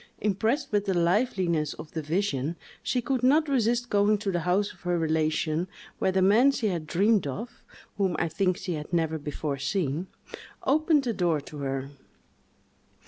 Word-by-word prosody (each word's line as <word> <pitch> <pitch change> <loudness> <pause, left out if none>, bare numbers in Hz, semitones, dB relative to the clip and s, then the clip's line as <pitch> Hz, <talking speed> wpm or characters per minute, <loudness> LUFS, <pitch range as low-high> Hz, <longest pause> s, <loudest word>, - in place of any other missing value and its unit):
Impressed 220 +8 0
with 205 -1 +1
the 190 -2 0
liveliness 175 - +1
of 155 - -10
the 160 - -3
vision, 155 -2 -1 0.3
she 250 -2 -1
could 260 0 0
not 295 +5 +4
resist 240 -2 +1
going 205 +1 +4
to 200 -1 -2
the 175 - 0
house 180 +4 0
of - - -23
her 180 -1 0
relation, 160 +1 0 0.3
where 190 - +2
the 190 0 +2
man 220 +8 +6
she 240 -6 0
had 170 -4 -3
dreamed 200 0 +2
of 215 - -6 0.4
(whom 190 -3 +1
I - - +1
think 185 +2 0
she 180 - -4
had 150 +1 -6
never 160 -2 0
before 145 -1 -4
seen) 165 +1 -1 0.6
opened 305 +1 +3
the 240 -3 -1
door 175 -5 +1
to 150 +1 -10
her. 135 -1 -3
185 Hz, 175 wpm, -27 LUFS, 160-220 Hz, 0.6 s, man